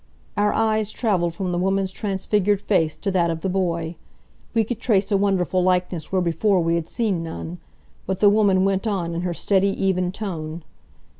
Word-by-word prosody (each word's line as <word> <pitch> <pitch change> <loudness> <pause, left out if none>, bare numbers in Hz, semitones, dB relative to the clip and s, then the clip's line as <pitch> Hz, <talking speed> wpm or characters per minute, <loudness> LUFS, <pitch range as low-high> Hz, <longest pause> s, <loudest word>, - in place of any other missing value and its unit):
Our 210 0 +2
eyes 220 -1 +1
traveled 180 -8 0
from 185 0 -2
the 175 - -1
woman's 195 +1 +1
transfigured 205 0 0
face 165 -7 +1
to 200 - -2
that 175 -2 +2
of 165 -1 -3
the 190 - -1
boy. 170 -3 -1 0.6
We 225 - +4
could 225 +1 -4
trace 205 -4 +1
a - - +4
wonderful 190 -2 +1
likeness 180 -3 0
where 185 -1 +1
before 180 +4 +2
we 165 0 +1
had 170 -1 -1
seen 210 -8 -1
none. 165 +1 -6 0.5
But 190 0 -2
the 205 - +5
woman 200 -2 +4
went 195 +2 0
on 180 -5 -1
in 170 - -2
her 175 -1 -2
steady, 195 +1 +2
even 185 -2 +1
tone. 170 -6 -5
190 Hz, 190 wpm, -23 LUFS, 170-205 Hz, 0.6 s, the